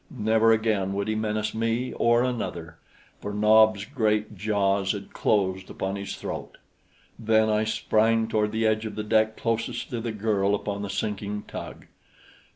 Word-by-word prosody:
Never 110 +1 +3
again 110 -4 +1
would 100 +1 -2
he 110 - 0
menace 110 0 -2
me 115 +3 -1
or 120 +1 +3
another, 85 -10 -4 0.4
for 105 - -5
Nob's 105 0 +4
great 110 -5 0
jaws 100 -1 +1
had 100 -1 -8
closed 95 -3 0
upon 95 +1 -3
his 100 -1 -5
throat. - - -6 0.6
Then 110 0 +3
I 105 +1 +1
sprang 110 +1 +2
toward 105 -1 0
the 110 +1 0
edge 110 0 +1
of 110 - -8
the 105 - -3
deck 110 0 +2
closest 115 0 -2
to 120 -2 -3
the 115 0 -3
girl 105 -2 +1
upon 100 0 -4
the 100 - -4
sinking 105 0 -3
tug. - - -8
110 Hz, 160 wpm, -26 LUFS, 100-110 Hz, 0.6 s, Nob's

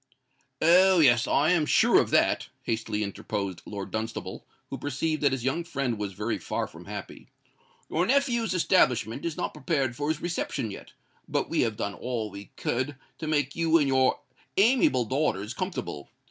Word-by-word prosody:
"Oh! 185 +3 +6
yes—I 140 +3 +4
am 160 -4 +2
sure - - +5
of - - -3
that," - - +2
hastily 110 -2 -2
interposed 100 -2 -4
Lord 100 -2 -6
Dunstable, 110 +1 -5 0.2
who - - -4
perceived 150 +3 -2
that 140 -2 +3
his 130 -3 -2
young 135 +7 0
friend 135 -9 -2
was 100 -2 -3
very 105 +4 -2
far - - -2
from - - -13
happy. - - -8 0.6
"Your 175 +3 0
nephew's 240 -6 +2
establishment 135 - +2
is 170 -1 -3
not 180 - -2
prepared 135 -8 -1
for 145 +3 -2
his 155 -1 0
reception 150 -9 -3
yet; - - -10 0.3
but - - -1
we - - +2
have 110 -2 0
done 100 -3 -2
all 115 -3 -4
we 100 +1 -9
could 130 +4 -1 0.2
to 160 - -4
make 145 -3 0
you 165 -1 +3
and 145 -3 +2
your 130 -1 +3 0.4
amiable 200 - +4
daughters 120 -5 -1
comfortable. 175 - -5
135 Hz, 170 wpm, -27 LUFS, 110-165 Hz, 0.6 s, Oh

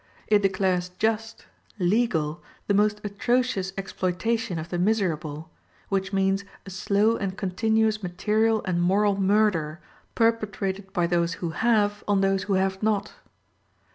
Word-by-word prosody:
It 210 -1 +3
declares 185 -2 +1
just, 225 0 -1 0.3
legal, 175 -5 +1 0.2
the 200 - +1
most 210 +1 +2
atrocious 210 -1 0
exploitation 190 +1 -2
of 160 +1 -5
the 175 - -2
miserable, 165 -6 -1 0.4
which 195 -1 -1
means 195 0 +1 0.2
a 195 - -9
slow 205 +4 +2
and 195 -1 -4
continuous 220 +3 +1
material 215 +4 +1
and 175 -3 0
moral 200 +2 +2
murder, 190 -6 +2 0.4
perpetrated 205 -4 0
by 175 - +1
those 170 0 +1
who 170 -2 -4
have 210 +1 +1
on 200 -1 +2
those 195 0 +2
who 205 - 0
have 190 0 0
not. 210 -1 0
195 Hz, 135 wpm, -25 LUFS, 180-215 Hz, 0.4 s, It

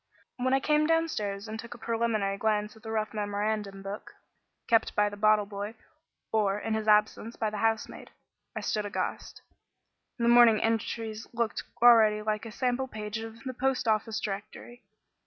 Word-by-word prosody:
When 260 +1 +2
I - - +3
came 300 +2 +2
downstairs 225 -12 0
and 220 +1 -6
took 235 +1 -8
a - - -11
preliminary 225 -3 -1
glance 210 0 -1
at 220 - -17
the 220 - -8
rough 215 -1 -2
memorandum 205 -1 -2
book, 195 +2 -7 0.5
kept 225 -1 +2
by 210 0 +3
the 205 - -8
bottle 215 0 +3
boy, 205 +2 -6 0.6
or, 205 -2 +2
in 220 +1 -3
his 220 0 -2
absence, 215 +2 +2
by 215 -1 -1
the 210 - -4
housemaid, 225 0 -1 0.5
I - - -3
stood 210 -1 -1
aghast. 205 - -4 0.7
The 235 -1 0
morning's 235 -2 +7
entries 225 0 -2
looked 235 -1 -1 0.2
already 220 -3 +6
like 215 +1 -2
a - - -8
sample 255 +3 -1
page 215 -2 -5
of 225 0 -9
the 260 -1 -4
Post 260 0 0
Office 220 0 +1
directory. 215 +4 -7
220 Hz, 170 wpm, -29 LUFS, 210-235 Hz, 0.7 s, morning's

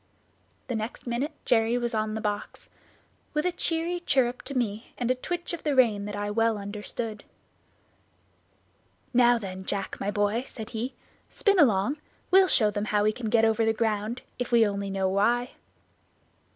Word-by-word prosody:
The 250 - -2
next 220 +1 -4
minute 255 +6 -2
Jerry 230 0 +3
was 240 -1 -2
on 215 0 -1
the 220 - -3
box; 205 -1 -4 0.7
with 300 +2 +1
a 360 - +2
cheery 340 0 -1
chirrup 260 -7 +1
to 280 - -6
me, 220 -2 -2
and 245 0 0
a - - +5
twitch 345 +8 -4
of 340 - -4
the 295 -3 0
rein 220 -6 +3
that 205 0 -5
I 205 0 -2
well 225 0 +2
understood. 210 +2 -5 1.9
"Now 240 -1 +5
then, 190 -3 -6
Jack, 195 0 -3
my 200 - -1
boy," 205 +4 0
said 220 -1 -8
he, 240 +3 -4 0.3
"spin 400 -2 +2
along, 245 - +3 0.3
we'll 380 0 +7
show 215 -11 +4
them 205 0 -2
how 210 -1 +1
we 215 - +3
can 225 0 -4
get 225 0 +4
over 225 0 +2
the 225 0 +3
ground, 220 +1 -1 0.2
if 245 - -3
we 230 -2 +6
only 200 -1 -3
know 195 -1 0
why." 235 +6 +2
225 Hz, 175 wpm, -27 LUFS, 210-250 Hz, 1.9 s, we'll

